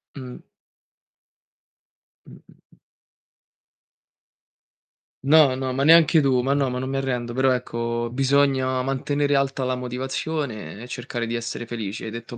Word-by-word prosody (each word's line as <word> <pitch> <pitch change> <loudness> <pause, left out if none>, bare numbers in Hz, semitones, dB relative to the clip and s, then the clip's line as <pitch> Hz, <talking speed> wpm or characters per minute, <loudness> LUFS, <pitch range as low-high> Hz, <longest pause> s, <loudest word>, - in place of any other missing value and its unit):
Mh. 130 -3 -8 1.9
Mh, - - -13
mh, - - -12 0.2
mh. - - -27 2.5
No, 140 -2 +5
no, 130 0 -3
ma 135 +2 0
neanche 160 +1 +6
tu. 130 -3 +2
Ma 135 +2 +1
no, 140 -1 +1
non 125 +1 -3
mi 135 +1 -2
arrendo, 125 -3 -2
però 130 +1 +2
ecco, 120 -1 -2
bisogna 130 -1 +2
mantenere 145 +2 0
alta 135 -1 0
la 130 0 0
motivazione 125 - -4
e - - -9
cercare 125 -1 -4
di 115 - -4
essere 120 0 -4
felice, 115 -3 -5
hai 110 - -5
detto 115 +1 -8
130 Hz, 135 wpm, -23 LUFS, 120-135 Hz, 2.5 s, neanche